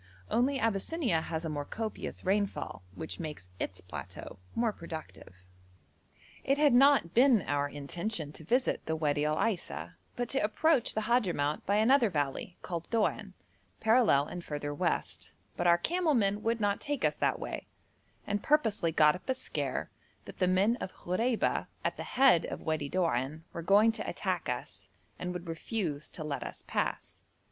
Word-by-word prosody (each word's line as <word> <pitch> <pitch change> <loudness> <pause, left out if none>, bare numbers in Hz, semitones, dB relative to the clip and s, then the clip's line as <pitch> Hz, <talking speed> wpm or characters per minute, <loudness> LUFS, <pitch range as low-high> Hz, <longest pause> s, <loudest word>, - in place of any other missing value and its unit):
Only 265 +4 +2
Abyssinia 225 - 0
has 160 0 -4
a - - -2
more 145 -1 -2
copious 220 +8 -5
rainfall, 200 - -1
which 160 - -6
makes 150 - -6
its 95 - -4
plateau 90 - -8 0.2
more 230 -2 +1
productive. 160 - -9 1.1
It 275 +1 +2
had 295 -3 +5
not 270 - +5
been 245 -5 +5
our 145 0 0
intention 155 +3 -4
to 160 - -9
visit 250 - +1
the 160 - 0
Wadi 150 -1 +1
Al 155 0 +1
Aisa, 85 - -2 0.2
but 245 0 -2
to 270 - +2
approach 275 +5 +2
the 220 - +1
Hadhramout 185 -11 +1
by 200 - +3
another 235 +2 +5
valley 145 +2 -2
called 170 -2 -4
Doan, 210 -3 0 0.4
parallel 220 - +4
and 175 +3 -7
further 145 -1 -4
west, 145 - -1 0.2
but - - 0
our 170 0 +6
camel 330 - +1
men 205 -2 +2
would 230 +1 0
not 205 -1 +1
take 290 -2 -1
us - - +2
that - - +1
way, - - -5 0.6
and 205 0 -1
purposely 220 - +2
got 150 -1 +5
up 180 - -10
a 260 - +2
scare 260 - -3 0.3
that - - -11
the 185 - +3
men 195 +6 +3
of 185 - -5
Khoreba 225 +7 0 0.2
at - - 0
the - - -7
head 255 -11 +6
of - - -5
Wadi 155 -3 -1
Doan 155 -3 0
were 170 - -4
going 205 +6 +5
to 225 - -4
attack - - -2
us, - - -4 0.3
and 180 - -3
would 180 -1 -6
refuse 165 -3 -3
to 160 - -7
let 140 -3 -3
us - - -7
pass. - - -3
185 Hz, 170 wpm, -31 LUFS, 155-230 Hz, 1.1 s, our